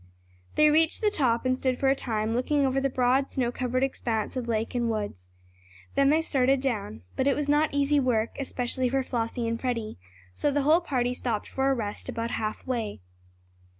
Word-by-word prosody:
They 305 0 +5
reached 320 +6 +3
the 425 -1 +3
top, 250 - +1
and 255 0 +2
stood 255 -1 -1
for 270 - +1
a 270 - +4
time 220 -4 -2
looking 275 +4 +1
over 270 0 +1
the 275 - +1
broad 260 +2 +2
snow 245 -3 -1
covered 255 +1 -1
expanse 230 -5 -2
of 250 -2 -3
lake 225 -1 -1
and 240 -2 0
woods. 205 - -4 0.6
Then 275 0 +4
they 315 +2 +3
started 270 -3 +2
down. 205 - -3
But 265 - +1
it 275 - +3
was 295 -1 -2
not 295 +2 +3
easy 285 +1 +2
work, 235 -4 0
especially 255 -1 -1
for 270 +1 +1
Flossie 235 -1 -2
and 230 0 -2
Freddie, 230 - -3 0.3
so 290 - 0
the 285 0 +1
whole 315 +5 +5
party 250 -7 0
stopped 235 -4 -2
for 270 0 0
a 270 - +2
rest 215 0 -4
about 230 -1 -3
half 215 0 -3
way. 230 - -3
255 Hz, 200 wpm, -27 LUFS, 230-275 Hz, 0.6 s, They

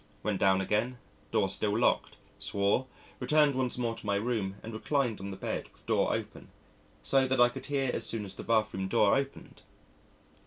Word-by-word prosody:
Went 105 -2 -1
down 95 0 +4
again 110 +6 0 0.3
door 95 - +2
still 100 +2 0
locked 120 - +1 0.2
swore 100 +6 +1 0.3
returned 150 +3 +4
once 130 -2 -1
more 120 -2 -1
to - - -11
my 100 -1 0
room 105 -3 -1
and 115 - -7
reclined 125 0 0
on 100 - -5
the 95 - -6
bed, - - -4
with - - -24
door - - +2
open, - - -5 0.5
so 135 -1 +3
that 130 0 +1
I 120 0 +7
could 130 +1 -8
hear 135 -3 0
as 115 - -1
soon 110 -1 -2
as 95 - -6
the - - -8
bath 110 -2 +2
room 95 0 -2
door 105 -1 +4
opened.... 135 0 -4
115 Hz, 195 wpm, -30 LUFS, 100-130 Hz, 0.5 s, I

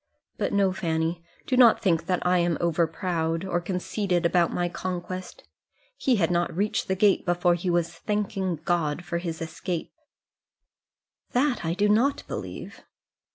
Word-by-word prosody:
But, - - 0
no, 195 -2 +2
Fanny; 165 -2 -1 0.2
do 260 - 0
not 245 -3 +7
think 165 -3 +1
that 180 -1 0
I 180 0 +4
am 170 -2 +1
over 170 -1 +2
proud, 165 0 -2
or 175 -2 -1
conceited 180 0 -1
about 170 0 +3
my 175 - 0
conquest. 185 +1 -5 0.5
He 260 - +2
had 175 -5 +1
not 175 0 +1
reached 205 +2 0
the 190 - +1
gate 200 0 +3
before 175 0 +2
he 175 +1 -2
was 170 -1 +1
thanking 195 0 -2
God 175 -1 0
for 170 -1 -2
his 165 -2 -4
escape." 165 +1 -4 1.4
"That 255 +1 +1
I 165 +1 -1
do 205 +2 +2
not 235 +7 +2
believe." - - -7
175 Hz, 155 wpm, -26 LUFS, 170-195 Hz, 1.4 s, not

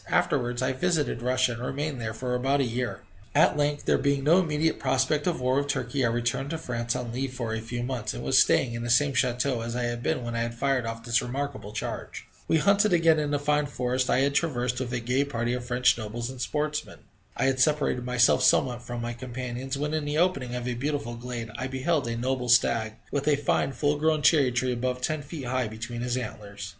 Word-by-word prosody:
Afterwards 120 +1 +1
I 130 - +1
visited 145 -3 0
Russia, 130 0 +2
and 120 0 -6
remained 140 0 -3
there 110 -1 -4
for 125 +1 -3
about 135 +3 +1
a - - +3
year. 125 0 -3 0.3
At 150 - +5
length, 145 0 0
there - - +3
being 140 -1 +1
no 165 +6 +5
immediate 160 -2 0
prospect 135 +4 +1
of 175 - 0
war 130 +1 +1
with 140 0 0
Turkey, 135 -2 -1
I - - +4
returned 120 +4 -1
to 165 - -2
France 120 -5 -3
on 120 -2 -4
leave 130 +1 -3
for 115 -3 -3
a 110 - -2
few 120 +2 -4
months, 120 - -3
and - - -6
was - - +4
staying 120 -3 +3
in 115 - -4
the 120 - -4
same 140 +4 +4
chateau 125 -1 +1
as 115 +1 -4
I 125 - -1
had 120 0 -2
been 130 0 -1
when 120 0 -4
I - - 0
had 115 0 -3
fired 130 -1 0
off 115 0 -5
this 120 0 +2
remarkable 135 -4 -4
charge. 110 - -5 0.2
We 160 - +3
hunted 200 +4 +3
again 165 -2 +4
in 150 -1 -1
the 145 - +1
fine 150 +1 +1
forest 125 0 -1
I 130 - +3
had 140 +1 +2
then 140 - +1
traversed, 125 -6 -1
with 125 -2 -3
a 125 - -1
gay 125 +4 +1
party 120 -4 -2
of 125 -1 -3
French 125 0 +3
nobles 115 +3 -4
and 130 -2 -8
sportsmen. 150 +3 -2 0.4
I - - +1
had 135 0 +1
separated 145 -3 +2
myself 125 -1 +3
somewhat 125 -2 +3
from 120 0 -5
my 120 0 -3
companions, 125 +2 -5
when, 150 +2 -2
in 155 -2 -1
the 145 +1 -1
opening 160 -8 +1
of 125 0 -4
a 125 - -1
beautiful 130 -2 -2
glade, 120 -1 -6
I 130 - -2
beheld 130 +2 0
a 115 0 -2
noble 125 0 -1
stag, 115 -2 +3 0.2
with 145 0 -2
a 150 - +5
fine 140 -1 0
full 145 +3 +1
grown 155 0 +1
cherry 145 -4 +5
tree 125 +1 0
above 125 +1 -2
ten 155 +2 -1
feet 145 -1 -7
high 125 -1 0
between 115 +2 -6
his 125 0 -1
antlers. 100 -5 -6
125 Hz, 235 wpm, -27 LUFS, 120-145 Hz, 0.4 s, At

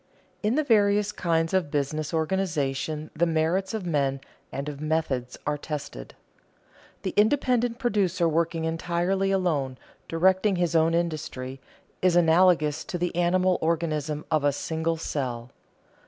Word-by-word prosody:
In 215 +3 +1
the 310 - +2
various 210 -4 +3
kinds 165 -3 0
of 185 -5 +1
business 145 +1 -2
organization 155 -3 -1
the 170 +2 +2
merits 165 +6 0
of 210 -4 -4
men 140 -5 0 0.3
and 140 +1 -4
of 145 -1 -6
methods 150 -6 -1
are 150 0 -1
tested. 145 - -6 0.9
The - - -2
independent 245 +1 +2
producer 195 -8 +1
working 165 0 0
entirely 175 +4 0
alone, 155 -9 0 0.3
directing 190 +4 +2
his 175 -1 0
own 165 +1 +4
industry, 155 -6 -3 0.4
is 180 -2 +3
analogous 165 -3 +4
to 180 - -4
the 175 0 -2
animal 180 +1 +2
organism 155 -2 -1
of 155 -2 +2
a 145 - +4
single 160 +3 -2
cell. 125 -6 -4
165 Hz, 135 wpm, -26 LUFS, 150-185 Hz, 0.9 s, own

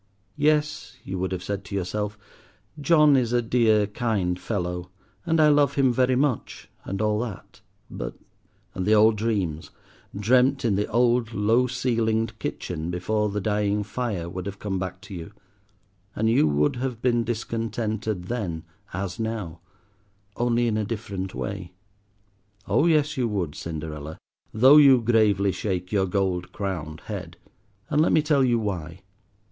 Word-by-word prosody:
"Yes," 150 0 +1
you 95 -1 -5
would 95 +1 -2
have 90 -1 -3
said 100 +1 -4
to 100 - -6
yourself—"John 105 - 0
is 120 -3 +1
a 120 - +3
dear, 110 -3 +3
kind 100 -5 -1
fellow, 90 -4 -3 0.4
and 165 0 +2
I 155 -1 +6
love 145 -2 +3
him 130 -3 +3
very 130 +1 +2
much, 135 -3 -1 0.2
and 95 - -4
all 105 0 +1
that, 110 -6 -7 0.3
but—" - - -6 0.6
and 95 - -3
the 110 - +5
old 110 +1 +5
dreams, 100 -8 -2 0.5
dreamt 125 +5 +3
in 105 -4 +2
the 105 +1 0
old 120 0 +2
low 115 +5 +3
ceilinged 115 -3 -1
kitchen 85 -2 -4
before 105 +5 -1
the 100 +1 -2
dying 105 0 0
fire, 105 -5 -3
would 95 +2 -6
have 100 0 -6
come 95 -2 -3
back 95 0 -5
to 100 - -11
you, 90 +3 -8 0.8
and 110 - 0
you 115 - +4
would 75 - +1
have 125 -2 -3
been 120 -2 +2
discontented 110 -3 -3
then 90 -7 -4 0.3
as 95 +1 -4
now, 110 -7 -4 0.8
only 120 0 +1
in 110 -2 0
a 110 - 0
different 100 -4 -5
way. 95 -2 -5 0.9
Oh 155 - +3
yes, 150 -3 +2
you 125 -2 +1
would, 95 -8 -2
Cinderella, 80 -1 -6 0.3
though 130 +7 +7
you 140 -4 +8
gravely 110 -4 +3
shake 90 -2 -3
your 95 -2 +2
gold 95 -2 -1
crowned 85 -6 -4
head. 90 -6 -7 0.5
And 150 0 +3
let 160 - +3
me 155 - +4
tell 145 -3 +3
you 120 -2 +3
why. 90 -7 -4
105 Hz, 155 wpm, -25 LUFS, 95-120 Hz, 0.9 s, you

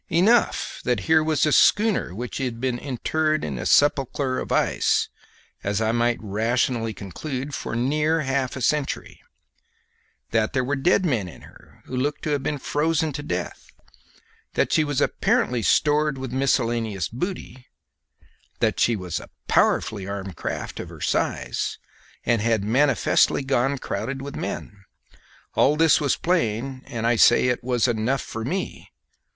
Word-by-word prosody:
Enough 205 +8 +2
that 125 -1 0
here 160 -1 +3
was 155 -2 +2
a 150 - +2
schooner 205 - +3
which 120 +5 -5
had 125 -4 -3
been 125 -1 -1
interred 155 +4 -1
in 70 -4 -4
a - - -2
sepulchre 135 -2 +2
of - - -6
ice, - - +2 0.5
as 100 +1 0
I 110 0 +1
might 120 0 +1
rationally 115 +2 0
conclude, 130 - -6
for 120 - -4
near 150 +6 +1
half 135 -2 -1
a 130 - -6
century, 145 +3 -1 1.1
that 110 +1 +1
there 130 -2 +1
were 140 +3 -1
dead 180 +7 +2
men 120 - 0
in 85 - -12
her - - -18
who 130 - -6
looked 145 +4 -1
to 155 - -1
have 145 -2 0
been 145 +2 -2
frozen 155 +3 0
to 145 - -4
death, 90 -10 -4 0.9
that - - +1
she 155 - +4
was 145 -2 -1
apparently 195 - +1
stored 150 +4 +2
with 130 -2 -6
miscellaneous 115 - 0
booty, 130 - -6 0.9
that - - +1
she 115 - +3
was 90 -4 -4 0.3
powerfully 100 -3 +1
armed 100 -1 -4
for - - -21
a - - -14
craft - - -4
of - - -6
her - - -11
size, - - -1 0.5
and 115 -2 +2
had 110 -2 +1
manifestly 135 +4 +3
gone 135 +1 +1
crowded 135 +1 -4
with 140 +1 -7
men. 100 -3 -6 0.7
All 145 - +4
this 160 -1 +4
was 140 -3 +2
plain, 130 -6 -1
and 115 -1 -4
I 120 0 +3
say 120 +3 +5
it 125 - -1
was 125 -1 +1
enough 120 +3 0
for 115 - -6
me. 185 +11 -4
130 Hz, 160 wpm, -24 LUFS, 115-150 Hz, 1.1 s, say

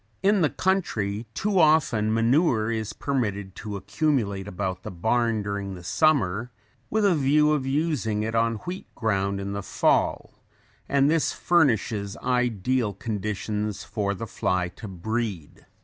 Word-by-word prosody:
In 200 0 +4
the 155 - +3
country 115 - -1
too 200 -2 +1
often 150 -9 +3
manure 115 0 +2
is 110 -2 -2
permitted 105 -8 -2
to 105 -2 -5
accumulate 100 -2 -1
about 95 -1 -3
the - - -6
barn 110 +4 0
during 100 -1 -4
the 90 - -11
summer 120 - +2 0.4
with 215 -1 +1
a 195 - +5
view 150 0 +3
of 140 -3 0
using 135 -8 0
it 110 +1 -3
on 115 0 +2
wheat 180 +2 -5
ground 100 -3 0
in 100 0 -4
the 100 - -3
fall - - +1 0.6
and 140 0 +4
this 160 +1 +2
furnishes 110 - +1
ideal 125 -2 0
conditions 105 -2 -3
for 100 -2 -2
the 115 - -5
fly 90 -3 -1
to 110 +5 -10
breed. 100 -3 -4
110 Hz, 145 wpm, -25 LUFS, 100-140 Hz, 0.6 s, a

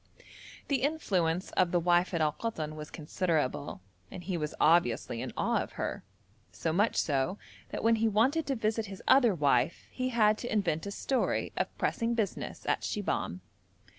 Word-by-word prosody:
The 280 -2 +1
influence 190 - 0
of 185 -2 +2
the 175 - +2
wife 175 +1 +3
at 170 -3 -1
Al 155 -1 +3
Koton 160 -9 -4
was 150 0 -7
considerable, 150 - -2 0.3
and 180 - -8
he 185 +1 -2
was 150 -2 -3
obviously 120 -7 +3
in - - -4
awe - - +1
of - - -7
her, - - -4 0.5
so 160 - -2
much 205 +6 +2
so 145 +6 +1 0.3
that - - -5
when 225 0 +4
he 225 +1 +2
wanted 260 +9 +2
to 275 - 0
visit 220 -1 -1
his 195 0 -9
other 240 -7 +6
wife 145 -1 +1
he 255 0 -2
had 215 -3 +3
to 245 - -5
invent 195 -5 0
a - - -4
story 260 +5 -1
of - - -2
pressing 235 0 0
business 215 -5 -3
at - - +1
Shibahm. 90 +2 -2
185 Hz, 175 wpm, -30 LUFS, 160-225 Hz, 0.5 s, other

